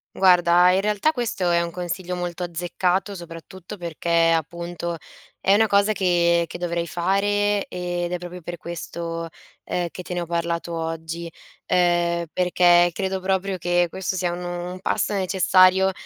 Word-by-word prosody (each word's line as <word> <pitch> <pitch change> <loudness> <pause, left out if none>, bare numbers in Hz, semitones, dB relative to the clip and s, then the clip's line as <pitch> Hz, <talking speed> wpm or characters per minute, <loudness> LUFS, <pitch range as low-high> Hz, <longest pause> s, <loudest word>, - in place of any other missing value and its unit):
Guarda, 180 -1 +5
in 190 +1 +2
realtà 210 +8 +1
questo 205 - -1
è 170 0 +3
un 170 - -2
consiglio 180 +1 -4
molto 175 0 -4
azzeccato 180 +3 -1
soprattutto 175 +2 -10
perché, 170 -1 +1
appunto, 170 +1 -4 0.4
è 195 - +3
una 220 +2 +4
cosa 200 +1 +3
che 170 -3 +2
che - - -7
dovrei 170 -1 -2
fare, 205 +3 +1
ed 175 -1 -3
è 180 - -1
proprio 180 +1 -9
per 175 +1 -6
questo, 165 0 -6 0.4
ehm, 175 -1 -2
che - - -8
te 180 0 -6
ne 175 - -1
ho - - -3
parlato 170 0 -2
oggi; 165 +1 -4 0.4
ehm, 175 -1 +2
perché 175 -1 +4
credo 190 +1 -2
proprio 190 0 -1
che 175 +1 +2
questo 190 +2 -4
sia 175 -2 -1
nu 175 0 -5 0.2
un 185 - -8
passo 190 - -1
necessario, 190 0 +4
175 Hz, 155 wpm, -23 LUFS, 170-190 Hz, 0.4 s, Guarda